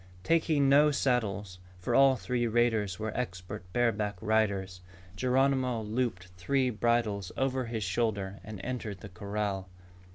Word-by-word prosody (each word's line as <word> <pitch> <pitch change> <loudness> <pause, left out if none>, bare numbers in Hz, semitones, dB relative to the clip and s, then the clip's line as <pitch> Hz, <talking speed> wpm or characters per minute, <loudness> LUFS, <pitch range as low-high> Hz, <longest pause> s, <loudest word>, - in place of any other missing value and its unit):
Taking 160 - +3
no 145 +2 +6
saddles, 105 -9 -1 0.2
for 90 - -3
all 135 -1 +6
three 120 0 -1
raiders 110 -5 +1
were 110 0 -4
expert 95 -4 -5
bareback 105 -4 0
riders, 100 -4 0 0.3
Geronimo 130 0 +1
looped 105 -5 -2
three 130 +8 +1
bridles 110 -4 0
over 130 -1 0
his 115 -2 -3
shoulder 100 0 -1
and 105 -2 -8
entered 110 -6 -4
the 105 - -8
corral. 100 0 -3
110 Hz, 130 wpm, -30 LUFS, 100-125 Hz, 0.3 s, no